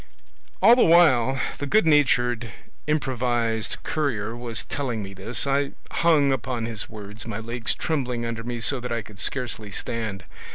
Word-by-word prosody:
"All 235 - +9
the 250 - +5
while 135 -7 +5 0.2
the 145 - -3
good 215 +6 +4
natured 125 -6 +3 0.4
improvised 120 -6 0
courier 120 -8 -1
was 120 -2 -1
telling 125 -7 -3
me 95 0 -8
this, 100 +8 -2
I 140 0 0 0.2
hung 155 -5 +3
upon 125 -2 -3
his 115 -2 -4
words, 105 0 -9
my 110 -3 -4
legs 115 +1 -2
trembling 125 -7 -2
under 115 -1 -4
me 120 0 -4
so 135 +3 +1
that 125 0 -6
I 115 -2 -1
could 100 -1 -14
scarcely 120 -5 -2
stand. 105 -2 -4
120 Hz, 160 wpm, -24 LUFS, 110-140 Hz, 0.4 s, All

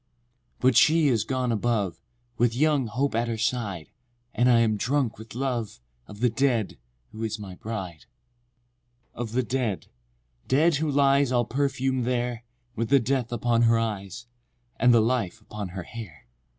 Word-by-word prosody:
VI. - - -42
But 125 -2 +4
she 155 +1 +5
is 115 -5 +2
gone 130 -2 -1
above, 110 -4 -1 0.3
With 120 0 +1
young 145 -2 +2
Hope 135 +6 -1
at 115 +1 0
her 115 -1 -2
side, 105 -7 -2 0.4
And 125 +1 +3
I 120 -1 +5
am 110 -2 +2
drunk 125 +1 -1
with 110 0 -11
love 125 - -3 0.3
Of 105 +1 -11
the 125 - +4
dead, 120 - 0 0.3
who 110 - -9
is 110 -1 -2
my 100 -3 -8
bride.— 95 -5 -6
VII. 120 0 -45
Of 120 -2 -5
the 130 +1 +1
dead—dead 100 - -2
who 155 +1 -1
lies 140 -1 +3
All 120 -2 +2
perfum'd 130 -1 -1
there, 120 -1 -1 0.3
With 115 0 -2
the 140 0 +6
death 125 0 -1
upon 120 0 +1
her 115 - +4
eyes, 105 -1 -4 0.5
And 125 +2 +5
the 115 -1 +6
life 115 -5 0
upon 105 -2 -7
her 90 0 -6
hair. 105 -7 -10
120 Hz, 165 wpm, -26 LUFS, 110-130 Hz, 0.5 s, the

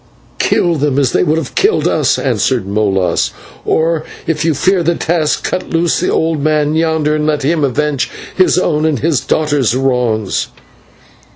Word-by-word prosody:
"Kill 170 -2 +1
them 145 -1 0
as 135 -3 +2
they - - +2
would 155 +2 +1
have 165 - -4
killed 415 +3 +2
us," - - +1
answered 125 -7 0
Molas; 100 -2 0 0.4
"or, 160 0 +1 0.2
if 160 -1 -1
you 160 -2 +1
fear 185 +6 +2
the 170 +1 +1
task, 160 -3 0
cut - - -3
loose 165 0 +1
the - - 0
old 160 -2 0
man 150 -1 +1
yonder 160 -2 +1
and 155 0 -1
let 150 -2 0
him 155 +2 +1
avenge 140 +1 0 0.3
his 185 -1 +3
own 155 -4 +1
and 155 -3 0
his 150 +1 +1
daughter's 145 -6 0
wrongs." 125 -6 0
150 Hz, 170 wpm, -14 LUFS, 135-165 Hz, 0.4 s, his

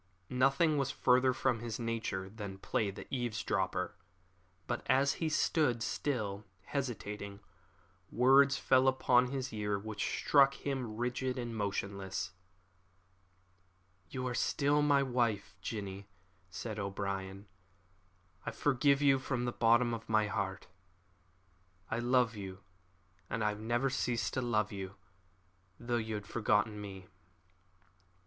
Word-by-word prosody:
Nothing 135 +4 +3
was 135 -1 0
further 130 -1 +3
from 130 -2 0
his 115 -1 -4
nature 115 -5 -2
than 100 -1 -7
play 100 +2 -1
the 100 - -8
eavesdropper; 120 -4 -1 0.7
but 120 - -2
as 135 +2 +4
he 160 - +1
stood, 145 -7 +2
still 105 -9 -2 0.2
hesitating, 105 -6 -4 0.7
words 135 +3 +5
fell 130 -1 +4
upon 125 -1 +4
his 130 -1 -4
ear 105 -1 -1
which 105 +1 -4
struck 140 -1 +5
him 130 -7 -3
rigid 125 +2 -1
and 120 -2 -4
motionless. 100 -4 -3 1.8
"You 130 -1 -4
are 125 - -2
still 145 +4 +2
my 145 -1 +4
wife, 120 -7 0
Jinny," 100 -1 -5 0.4
said 105 +4 -5
O'Brien; 100 0 -4 1.0
"I - - -3
forgive 140 0 +2
you 135 -2 +5
from 130 -2 -2
the 120 - 0
bottom 120 +1 +3
of 115 -1 -6
my 110 -1 +3
heart. 100 -2 -3 1.3
I 115 - 0
love 120 -1 +2
you, 95 -1 -7 0.7
and 115 -3 -1
I 105 - +3
have 105 0 -4
never 120 +4 0
ceased 120 -3 -1
to 130 - 0
love 110 -4 +1
you, 95 -1 -6 0.8
though 120 0 -1
you 110 -1 -2
had 105 -1 -5
forgotten 105 0 +1
me." 95 -2 -8
115 Hz, 125 wpm, -33 LUFS, 105-130 Hz, 1.8 s, words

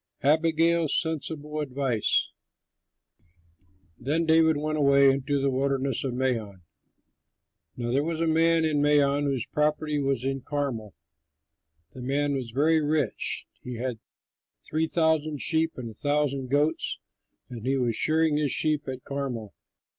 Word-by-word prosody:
ABIGAIL'S 160 +1 +3
SENSIBLE 155 -2 -4
ADVICE 130 -5 0 1.7
Then 155 +6 0
David 160 -1 +4
went 155 +1 -2
away 140 -1 +5
into 140 +1 -1
the 135 0 +1
Wilderness 135 -1 -1
of 130 -3 -3
Maon. 115 -8 -2 1.1
Now 120 -1 -3
there 135 +3 +2
was 165 0 -3
a 165 - +1
man 165 0 +3
in 150 -2 +1
Maon, 145 -1 +3
whose 135 -5 -1
property 150 0 0
was 135 -3 -1
in 135 0 -2
Carmel. 130 -8 -4 1.0
The 130 - -10
man 140 +3 0
was 130 -4 -3
very 155 +6 +2
rich; 150 +1 -1 0.2
he 125 -1 -7
had 120 -1 -4 0.7
three 160 +1 -1
thousand 160 -3 +1
sheep 160 +1 +1
and 125 -2 -6
a - - -13
thousand 140 +1 -1
goats, 145 +3 +1 0.5
and 120 -3 -9
he 135 +1 +1
was 120 -3 0
shearing 155 +1 +2
his 150 -3 0
sheep 155 -2 +1
at 130 -1 -6
Carmel. 130 -7 -5
145 Hz, 140 wpm, -26 LUFS, 130-155 Hz, 1.7 s, away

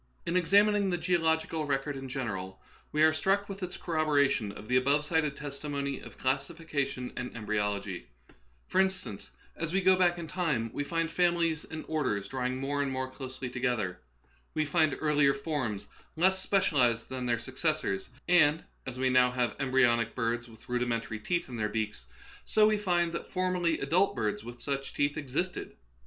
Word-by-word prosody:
In 170 - -1
examining 200 +3 +4
the 175 - 0
geological 160 -2 +1
record 140 +1 -1
in 135 -1 -6
general, 95 -8 -4 0.3
we 150 +1 +3
are 160 0 +6
struck 195 +5 +1
with 195 0 -7
its 180 0 -4
corroboration 145 - +1
of 105 +1 -10
the 125 - +1
above 140 +3 +2
cited 150 -3 +1
testimony 140 -1 -4
of - - -12
classification 140 -1 -2
and 125 - -4
embryolog}^ 105 -4 -2 0.6
For 190 - +3
instance, 185 - -2 0.3
as 165 +1 -3
we 195 - +3
go 190 0 +5
back 175 -1 +3
in 170 - -5
time, 155 -10 -1
we 145 - -1
find 165 +2 -1
fam 175 -1 +3
ilies 165 -2 0
and 160 0 -6
orders 130 -11 -1
drawing 130 -1 -2
more 140 +2 -1
and 140 -1 -1
more 130 0 -3
closely 130 -1 -6
together; 120 -7 -1 0.6
we 155 - +2
find 155 0 +2
earlier 150 -2 +3
forms 140 -8 -3 0.3
less 190 +3 +3
specialized 130 - +2
than 130 -1 -3
their 120 -1 +2
successors; 130 - -1 0.2
and, 160 -3 +5 0.2
as 130 -1 -5
we 130 0 +2
now 125 0 +5
have 125 -1 -1
em 135 -2 -1
bryonic 120 -3 +3
birds 120 0 -1
with 110 -1 -16
rudimentary 120 -2 -1
teeth 175 +10 -1
in 125 - -6
their 105 -1 0
beaks, 105 - -3 0.4
so 215 -1 +4
we 215 0 +4
find 175 -4 +1
that 170 - -5
formerly 180 -3 +1
adult 175 +8 +2
birds 105 -1 -1
Vt^'ith 120 +2 -10
such 140 -1 -3
teeth 145 0 +1
existed. 155 +5 -3
140 Hz, 175 wpm, -30 LUFS, 125-170 Hz, 0.6 s, are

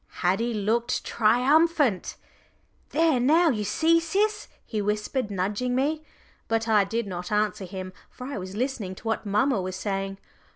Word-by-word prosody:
Haddie 225 +6 +1
looked 230 +4 0
triumphant. 260 - +2 0.7
"There 315 -4 +2
now 320 +7 +4
you 210 -4 -2
see, 320 +11 +3
Sis," 415 +6 0 0.2
he 215 -2 -3
whispered, 210 +3 -1
nudging 205 +6 -1
me. 300 +4 0 0.4
But 225 0 0
I 210 -3 +4
did 230 +3 -2
not 180 -1 -6
answer 210 -2 0
him, 185 0 -7 0.2
for 250 - -10
I 275 -5 -4
was 185 +1 -7
listening 225 -6 -2
to - - -14
what 220 -1 -1
mamma 210 +2 +2
was 185 0 -4
saying. 195 0 -3
225 Hz, 155 wpm, -26 LUFS, 200-270 Hz, 0.7 s, now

